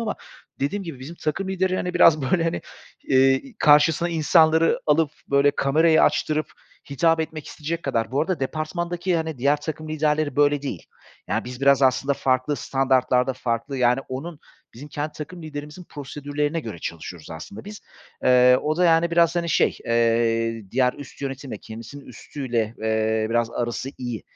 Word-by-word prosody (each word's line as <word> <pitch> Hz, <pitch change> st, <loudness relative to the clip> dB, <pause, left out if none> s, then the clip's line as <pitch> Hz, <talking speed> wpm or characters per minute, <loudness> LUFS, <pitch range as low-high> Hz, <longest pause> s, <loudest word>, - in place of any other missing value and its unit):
ama 225 Hz, -2 st, -2 dB, 0.5 s
dediğim 195 Hz, +9 st, -1 dB
gibi 155 Hz, -6 st, -7 dB
bizim 145 Hz, +6 st, -8 dB
takım 180 Hz, +6 st, -3 dB
lideri, 185 Hz, -1 st, 0 dB
hani, 180 Hz, -1 st, -3 dB
biraz, 155 Hz, -4 st, +5 dB
böyle, 170 Hz, -3 st, +2 dB
hani, 165 Hz, -, -1 dB, 0.5 s
eee, 135 Hz, -, +3 dB
karşısına 150 Hz, +3 st, +4 dB
insanları 160 Hz, 0 st, +3 dB
alıp, 150 Hz, 0 st, +3 dB, 0.2 s
böyle, 140 Hz, +1 st, +4 dB
kamerayı 155 Hz, +3 st, +3 dB
açtırıp 155 Hz, 0 st, +1 dB, 0.4 s
hitap 165 Hz, +3 st, +2 dB
etmek 155 Hz, -1 st, -5 dB
isteyecek 165 Hz, +3 st, -5 dB
kadar 115 Hz, -4 st, -1 dB
Bu 140 Hz, -, +1 dB
arada 175 Hz, 0 st, -1 dB
departmandaki, 170 Hz, +5 st, -2 dB
hani, 160 Hz, -3 st, -3 dB
diğer 140 Hz, +4 st, +3 dB
takım 155 Hz, 0 st, -6 dB
liderleri 155 Hz, -1 st, 0 dB
böyle 145 Hz, -1 st, +3 dB
değil. 105 Hz, -, -5 dB, 0.5 s
Ya, 110 Hz, +4 st, -1 dB
biz 125 Hz, +1 st, -8 dB
biraz 140 Hz, 0 st, +4 dB
aslında 135 Hz, +2 st, +2 dB
farklı 130 Hz, +2 st, 0 dB
standartlarda, 130 Hz, -1 st, +1 dB
farklı, 125 Hz, +2 st, -3 dB
yani, 125 Hz, +1 st, +3 dB
onun, 145 Hz, +5 st, -6 dB, 0.4 s
bizim 145 Hz, +5 st, -10 dB
kendi 150 Hz, +1 st, -4 dB
takım 165 Hz, +3 st, -8 dB
liderimizin 150 Hz, +3 st, -8 dB
prosedürlerine 145 Hz, +2 st, -4 dB
göre 110 Hz, -, -7 dB
çalışıyoruz 80 Hz, 0 st, -7 dB
aslında 80 Hz, +6 st, -9 dB
biz. 210 Hz, +1 st, -9 dB, 0.4 s
Eee, 125 Hz, 0 st, +6 dB
o 155 Hz, +1 st, -1 dB
da, 180 Hz, -, +2 dB
yani 165 Hz, 0 st, +4 dB
biraz, 170 Hz, 0 st, +3 dB
hani, 170 Hz, -1 st, -1 dB
şey, 140 Hz, -, +2 dB
eee, 115 Hz, -1 st, +1 dB
diğer 125 Hz, 0 st, +2 dB
üst 145 Hz, -1 st, -12 dB
yönetimle, 135 Hz, -5 st, -5 dB
kendisinin 115 Hz, +6 st, -10 dB
üstüyle, 120 Hz, -5 st, -4 dB
eee, 110 Hz, 0 st, 0 dB
biraz 120 Hz, 0 st, +1 dB
arası 120 Hz, +2 st, -3 dB
iyi. 120 Hz, -4 st, -5 dB
145 Hz, 160 wpm, -23 LUFS, 125-160 Hz, 0.5 s, Eee